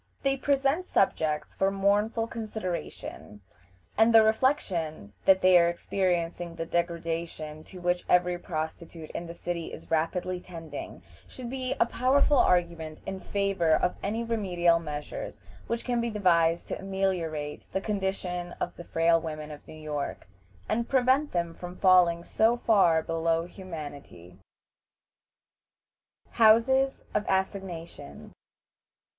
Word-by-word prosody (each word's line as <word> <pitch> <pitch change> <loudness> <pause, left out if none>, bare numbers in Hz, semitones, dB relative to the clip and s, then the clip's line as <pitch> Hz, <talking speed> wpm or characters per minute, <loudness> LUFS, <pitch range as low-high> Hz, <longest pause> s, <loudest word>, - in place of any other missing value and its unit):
They 275 0 +2
present 275 +5 +1
subjects 155 -5 +1
for 195 - +1
mournful 205 +3 +1
consideration, 215 - -6 0.5
and 225 +2 +5
the 225 -1 +8
reflection 190 - 0
that 190 -1 +6
they 185 -1 +7
are 170 0 +4
experiencing 175 -1 -1
the 165 0 -4
degradation 165 -2 -3
to 185 - -11
which 175 0 0
every 180 0 +3
prostitute 160 -1 -6
in 170 - -5
the 170 - -8
city 170 -1 -4
is - - -11
rapidly 175 +3 0
tending, 165 -5 -8 0.2
should 250 -2 -8
be 260 -1 -2
a - - +5
powerful 270 +3 +3
argument 170 -5 +1
in 195 0 -4
favor 195 -5 +1
of 180 - 0
any 220 +4 -2
remedial 180 -7 +2
measures 150 -2 -6 0.3
which 235 0 -3
can 245 -2 0
be 235 - -1
devised 170 -5 +2
to - - -3
ameliorate 180 -6 -2
the 190 - 0
condition 190 -3 -3
of 175 - -3
the 175 - -8
frail 165 0 +2
women 155 -1 -6
of 150 - -11
New - - -10
York, 150 -2 -4 0.4
and 235 +1 -1
prevent 265 +3 +3
them 170 -1 -1
from 180 +1 -8
falling 175 -2 +5
so 225 +6 +2
far 185 -9 +4
below 165 0 0
humanity. 145 - -9 1.9
HOUSES 245 +5 +4
OF 210 - +1
ASSIGNATION. 190 - -4
180 Hz, 130 wpm, -28 LUFS, 165-215 Hz, 1.9 s, the